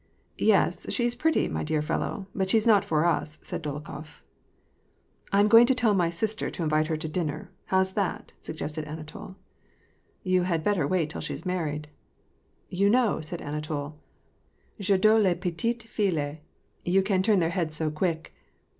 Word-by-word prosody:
"Yes, - - +2
she's 240 -1 +1
pretty, 315 +6 +1
my - - -3
dear 155 -1 0
fellow; 190 +5 -2
but 190 -1 -1
she's 220 +1 +3
not 210 -4 +5
for 155 0 +1
us," 155 -3 0
said - - -4
Dolokhof. 150 - -7 0.5
" - - -35
I 200 - +3
am 205 - +5
going 230 +2 +8
to 265 - +3
tell 235 -4 +3
my 175 -4 +2
sister 215 +6 -2
to 170 - -4
invite 155 0 +2
her 160 -1 -1
to 155 - -4
dinner. 155 0 -3
— - - -41
How's 190 0 +2
that? 200 -3 -2
" - - -37
suggested 155 0 -5
Anatol. 155 +5 -8 0.4
" - - -39
You 180 -1 +3
haa 175 -2 +1
better 165 -2 +1
wait 165 -4 0
till - - -6
she's - - -5
married 155 -5 -2 0.3
" - - -40
— - - -41
"You 200 0 +5
know," 235 -5 +3
said 165 +2 -5
Anatol, 150 0 -4 0.9
^'f 200 0 -1
adore 215 +3 +5
les 190 -4 +3
petites 200 +7 -2
filles; 165 -10 -1 0.5
you 190 +2 +3
can 190 -1 +1
turn 210 +1 +3
their 165 -3 +2
heads 170 -4 -1
so 155 0 -1
quick." 165 +1 -2
175 Hz, 185 wpm, -27 LUFS, 155-200 Hz, 0.9 s, going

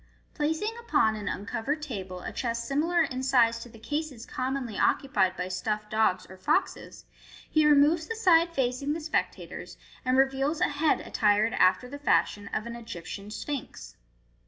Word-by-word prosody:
* - - -37
Placing 320 +9 -1
upon 330 - +2
an 210 -1 -6
uncovered 275 +9 -3
table 190 -9 -6
a - - -5
chest 235 -1 -2
similar 330 +5 +2
in 260 -4 -3
size 240 -3 +3
to 240 - -9
the 225 - -14
cases 290 0 -4
commonly 255 -3 -3
occupied 190 -9 +1
by 180 - -2
stuffed 210 +3 -3
dogs 215 -4 +2
or 190 - -12
foxes, 185 - -1 0.4
he 310 -1 +3
removes 300 +3 +4
the 455 - -3
side 340 -6 +4
facing 270 0 -1
the 325 - -3
spectators, 310 0 -3 0.3
and 255 0 +2
reveals 270 +3 +2
a - - +2
head 295 +1 +1
attired 210 +2 +2
after 250 +3 +3
the 285 +3 -8
fashion 205 -7 +1
of 215 - -2
an 235 0 -6
Egyptian 205 -3 -8
Sphinx. 275 +4 -6
255 Hz, 165 wpm, -28 LUFS, 215-300 Hz, 0.4 s, removes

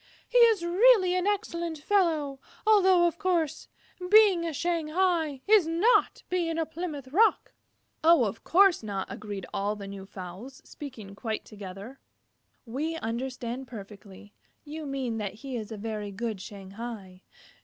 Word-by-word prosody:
He - - +3
is 450 -6 +5
really 375 +1 +5
an 365 +1 0
excellent 340 -5 -2
fellow, 305 -5 +1 0.3
although, 380 -5 +5
of 340 0 -1
course, 350 -6 0 0.4
being 410 -4 +6
a - - -2
Shanghai 330 -2 0
is 415 -6 +5
not 350 +9 +2
being 340 -3 -1
a 325 - 0
Plymouth 315 -5 -6
Rock." 430 +11 +2 0.5
"Of 250 - +4
course 390 0 +4
not," 200 -3 -3
agreed 205 -3 -6
all 205 +1 -1
the 200 -1 -8
new 195 -1 -8
fowls, 195 +8 -9
speaking 235 -9 -9
quite 220 +1 -4
together. 200 +5 -10 0.7
"We 290 +8 -3
understand 250 -1 -4
perfectly. 205 -2 -11 0.3
You 305 0 -7
mean 260 -5 -3
that 205 -1 -4
he 260 +3 -7
is 220 -2 -5
a 220 - -5
very 210 -1 -4
good 215 -1 -4
Shanghai." 195 -1 -9
275 Hz, 140 wpm, -28 LUFS, 215-345 Hz, 0.7 s, being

